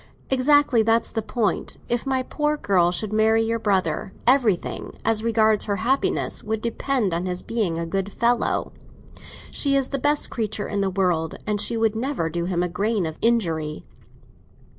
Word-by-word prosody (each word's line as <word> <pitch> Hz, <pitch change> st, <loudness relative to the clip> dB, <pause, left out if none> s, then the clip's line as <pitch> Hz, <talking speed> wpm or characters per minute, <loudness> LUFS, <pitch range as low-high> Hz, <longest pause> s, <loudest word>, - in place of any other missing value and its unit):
"Exactly; 265 Hz, -2 st, +4 dB
that's 225 Hz, +1 st, +1 dB
the 225 Hz, -, -2 dB
point. 220 Hz, -3 st, -2 dB
If 240 Hz, +3 st, -1 dB
my 260 Hz, -1 st, +1 dB
poor 300 Hz, +3 st, -1 dB
girl 185 Hz, -7 st, +2 dB
should 215 Hz, +3 st, -3 dB
marry 220 Hz, +1 st, +3 dB
your 230 Hz, +1 st, -1 dB
brother, 190 Hz, -4 st, -1 dB
everything—as 225 Hz, -2 st, +1 dB
regards 220 Hz, -2 st, +2 dB
her 205 Hz, -, -1 dB
happiness—would 220 Hz, -1 st, -1 dB
depend 235 Hz, -2 st, -1 dB
on 175 Hz, +2 st, -2 dB
his 180 Hz, 0 st, -3 dB
being 210 Hz, -8 st, -1 dB
a 170 Hz, -, -2 dB
good 195 Hz, +3 st, -3 dB
fellow. 235 Hz, +2 st, 0 dB, 0.8 s
She 280 Hz, -1 st, +1 dB
is 270 Hz, -2 st, +1 dB
the 275 Hz, -, -2 dB
best 290 Hz, +2 st, +1 dB
creature 215 Hz, -3 st, -3 dB
in 205 Hz, -1 st, -2 dB
the 195 Hz, -, +1 dB
world, 180 Hz, -4 st, 0 dB
and 210 Hz, -1 st, +1 dB
she 235 Hz, -, +2 dB
could 225 Hz, -1 st, +1 dB
never 230 Hz, -, -2 dB
do 170 Hz, +1 st, -2 dB
him 175 Hz, -1 st, 0 dB
a -, -, 0 dB
grain 200 Hz, +2 st, -1 dB
of 160 Hz, -1 st, -6 dB
injury. 165 Hz, -10 st, 0 dB
220 Hz, 165 wpm, -23 LUFS, 185-235 Hz, 0.8 s, Exactly